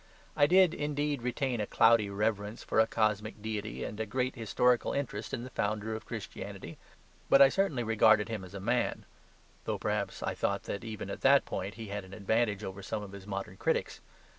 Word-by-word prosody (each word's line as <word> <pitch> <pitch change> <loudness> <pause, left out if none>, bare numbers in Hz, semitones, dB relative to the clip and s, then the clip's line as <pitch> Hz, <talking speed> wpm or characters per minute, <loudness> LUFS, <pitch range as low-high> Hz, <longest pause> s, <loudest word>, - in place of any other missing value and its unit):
I 145 - +5
did, 185 0 +5
indeed, 145 -2 -1
retain 125 -1 -1
a 105 - -2
cloudy 115 -2 +4
reverence 105 +1 -2
for - - 0
a 110 - +5
cosmic 110 -1 0
deity 110 0 -4
and 105 - -6
a 110 - -2
great 130 +3 -1
historical 120 +1 +1
interest 135 -7 -3
in 120 - -3
the 130 - -8
Founder 110 +1 -1
of 110 - -7
Christianity. - - -7 0.5
But 135 - +7
I 140 -1 +9
certainly 155 -8 0
regarded 110 -1 +4
Him 110 -4 -4
as 95 +2 -11
a - - -4
man; 120 +5 0 0.6
though - - -1
perhaps 105 -1 -2
I - - -1
thought - - -1
that, 100 - -5
even 110 -3 -6
in - - -5
that - - +5
point, 100 0 -4
He 110 -2 -8
had 100 0 -4
an 95 +1 -11
advantage 110 0 0
over 95 0 -6
some 105 +2 -4
of 100 - -9
His 100 0 -10
modern 100 -1 -5
critics. - - -1
110 Hz, 200 wpm, -31 LUFS, 105-125 Hz, 0.6 s, I